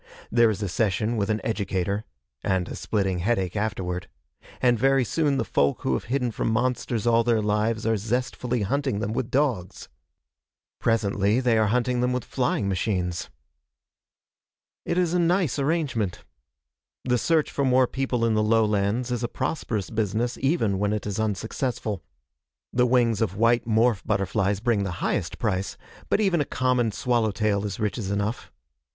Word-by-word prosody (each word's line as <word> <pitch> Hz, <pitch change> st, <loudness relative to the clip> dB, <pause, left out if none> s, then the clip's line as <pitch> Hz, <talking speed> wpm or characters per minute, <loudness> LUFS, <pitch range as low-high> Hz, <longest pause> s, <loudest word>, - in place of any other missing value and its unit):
There 115 Hz, -1 st, +5 dB
is 105 Hz, -1 st, -2 dB
a -, -, -1 dB
session 105 Hz, +4 st, 0 dB
with 100 Hz, -2 st, -1 dB
an 110 Hz, 0 st, +1 dB
educator 100 Hz, -1 st, -1 dB, 0.4 s
and 95 Hz, -2 st, 0 dB
a -, -, -6 dB
splitting 95 Hz, -4 st, -1 dB
headache 95 Hz, -2 st, 0 dB
afterward 95 Hz, -4 st, -2 dB, 0.5 s
and 120 Hz, -2 st, +3 dB
very 135 Hz, +1 st, +4 dB
soon 145 Hz, +1 st, +1 dB
the -, -, 0 dB
folk 70 Hz, 0 st, +1 dB
who 65 Hz, -, +1 dB
have -, -, -2 dB
hidden 125 Hz, -1 st, 0 dB
from 115 Hz, -, -2 dB
monsters 120 Hz, -1 st, 0 dB
all 115 Hz, 0 st, +4 dB
their 115 Hz, -1 st, +2 dB
lives 105 Hz, +1 st, 0 dB
are 115 Hz, 0 st, +2 dB
zestfully 120 Hz, +2 st, -1 dB
hunting 135 Hz, +1 st, 0 dB
them 105 Hz, +1 st, -2 dB
with 120 Hz, 0 st, -2 dB
dogs. 125 Hz, -11 st, -1 dB, 0.9 s
Presently 105 Hz, -1 st, +1 dB
they 125 Hz, -3 st, +2 dB
are 110 Hz, -1 st, +3 dB
hunting 125 Hz, +2 st, +1 dB
them 125 Hz, 0 st, +1 dB
with 125 Hz, -, -2 dB
flying 125 Hz, -5 st, 0 dB
machines. 90 Hz, -3 st, -1 dB, 1.6 s
It 170 Hz, -, -1 dB
is 175 Hz, -2 st, +2 dB
a 180 Hz, -, +2 dB
nice 175 Hz, -, +2 dB
arrangement. 135 Hz, -, -1 dB, 0.8 s
The 125 Hz, -1 st, +1 dB
search 160 Hz, +2 st, +2 dB
for 140 Hz, -, -1 dB
more 130 Hz, -1 st, +4 dB
people 125 Hz, -2 st, -1 dB
in 115 Hz, -, +2 dB
the 110 Hz, -, +2 dB
lowlands 110 Hz, +2 st, +1 dB
is 120 Hz, -1 st, -1 dB
a -, -, +1 dB
prosperous 120 Hz, -, -3 dB
business 110 Hz, +2 st, -1 dB
even 125 Hz, -, +1 dB
when 105 Hz, +1 st, +1 dB
it 105 Hz, -, -3 dB
is 105 Hz, 0 st, -3 dB
unsuccessful. 110 Hz, 0 st, -2 dB, 0.7 s
The 125 Hz, 0 st, +3 dB
wings 120 Hz, -3 st, +2 dB
of 100 Hz, -3 st, -1 dB
white 115 Hz, +2 st, +3 dB
morph 110 Hz, -2 st, +2 dB
butterflies 100 Hz, 0 st, 0 dB
bring 115 Hz, -4 st, +1 dB
the 100 Hz, -3 st, -3 dB
highest -, -, -1 dB
price, 95 Hz, 0 st, -2 dB, 0.3 s
but -, -, +2 dB
even 190 Hz, -7 st, +2 dB
a -, -, 0 dB
common 125 Hz, -4 st, +1 dB
swallow 120 Hz, 0 st, +1 dB
tail 105 Hz, -1 st, 0 dB
is 100 Hz, -3 st, -4 dB
riches 105 Hz, -1 st, -2 dB
enough. 100 Hz, +3 st, -2 dB
115 Hz, 165 wpm, -25 LUFS, 100-125 Hz, 1.6 s, There